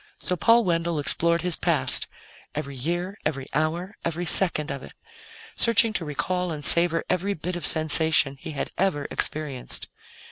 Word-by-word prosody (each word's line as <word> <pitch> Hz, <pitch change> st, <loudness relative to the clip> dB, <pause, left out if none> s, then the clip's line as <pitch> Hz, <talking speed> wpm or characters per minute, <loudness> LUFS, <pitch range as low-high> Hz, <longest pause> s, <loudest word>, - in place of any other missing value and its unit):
So 180 Hz, -, -2 dB
Paul 230 Hz, +7 st, +4 dB
Wendell 170 Hz, -3 st, -1 dB
explored 170 Hz, +3 st, +4 dB
his 180 Hz, -2 st, +4 dB
past, -, -, +3 dB, 0.5 s
every 140 Hz, -2 st, -5 dB
year, 175 Hz, +8 st, -3 dB
every 140 Hz, -3 st, -3 dB
hour, 165 Hz, +7 st, -2 dB
every 170 Hz, +1 st, -3 dB
second 165 Hz, -4 st, +1 dB
of 140 Hz, -1 st, -6 dB
it, -, -, -12 dB, 0.6 s
searching 230 Hz, -1 st, +4 dB
to 185 Hz, -, -3 dB
recall 175 Hz, +5 st, -2 dB
and 150 Hz, -2 st, -5 dB
savor 170 Hz, -1 st, +3 dB
every 195 Hz, +3 st, -1 dB
bit 175 Hz, +3 st, -5 dB
of 175 Hz, -4 st, -1 dB
sensation 155 Hz, -2 st, +2 dB
he 155 Hz, -, -8 dB
had 140 Hz, -, -4 dB
ever 165 Hz, -7 st, 0 dB
experienced. 135 Hz, -, -3 dB
165 Hz, 155 wpm, -24 LUFS, 150-180 Hz, 0.6 s, Paul